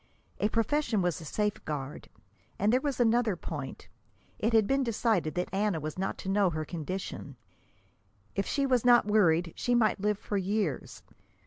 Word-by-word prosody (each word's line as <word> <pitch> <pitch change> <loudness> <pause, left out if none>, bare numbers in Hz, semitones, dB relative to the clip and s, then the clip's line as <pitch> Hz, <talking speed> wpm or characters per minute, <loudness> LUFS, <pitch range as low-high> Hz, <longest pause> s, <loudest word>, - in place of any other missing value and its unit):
A 210 - +2
profession 230 -2 +1
was 175 -2 -1
a - - -9
safeguard. 150 -7 -3 0.5
And 210 +4 +2
there 255 - +3
was 280 -3 -2
another 235 -3 +3
point: 150 -5 -7 0.5
it 225 - +1
had 220 -2 +5
been 270 +6 +1
decided 220 -8 0
that 180 +1 -2
Anna 200 -3 +1
was 155 +3 -5
not 190 - -2
to - - -4
know 195 -1 +3
her 155 -2 -3
condition. 175 +4 -5 1.0
If 195 - -1
she 280 -1 +1
was 255 -3 +2
not 240 -2 +6
worried 175 -5 +3
she 245 - 0
might 215 -4 +2
live 210 0 +1
for 205 - -3
years. 195 - -2
205 Hz, 170 wpm, -29 LUFS, 175-230 Hz, 1.0 s, not